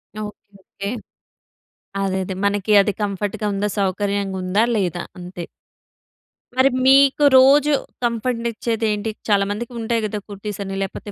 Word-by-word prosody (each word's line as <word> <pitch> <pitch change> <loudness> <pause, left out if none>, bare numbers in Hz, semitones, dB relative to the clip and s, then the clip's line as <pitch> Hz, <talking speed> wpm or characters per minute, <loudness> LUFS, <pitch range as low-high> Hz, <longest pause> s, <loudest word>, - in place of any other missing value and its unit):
Okay. 215 0 -4 0.3
Okay. 200 +1 -7 1.1
అదే 190 -1 0
అదే. 190 0 -5
మనకి 205 +1 0
అది 205 0 0
కంఫర్ట్‌గ 205 +1 -3
ఉందా, 205 +1 -1
సౌకర్యంగుందా, 195 0 0
లేదా 180 -4 -1 0.2
అంతే. 175 -1 -7 1.1
మరి 260 +1 +5 0.2
మీకు 275 +2 +5
రోజూ 285 +3 +6 0.3
కంఫర్ట్‌నిచ్చేది 230 -1 -1
ఏంటి? 210 +1 -2 0.2
చాలామందికి 205 +4 0
ఉంటాయి 230 0 0
కదా 210 0 -3
కుర్తీసని, 200 -1 -5
లేపోతే 195 +2 -7
205 Hz, 115 wpm, -21 LUFS, 195-230 Hz, 1.1 s, రోజూ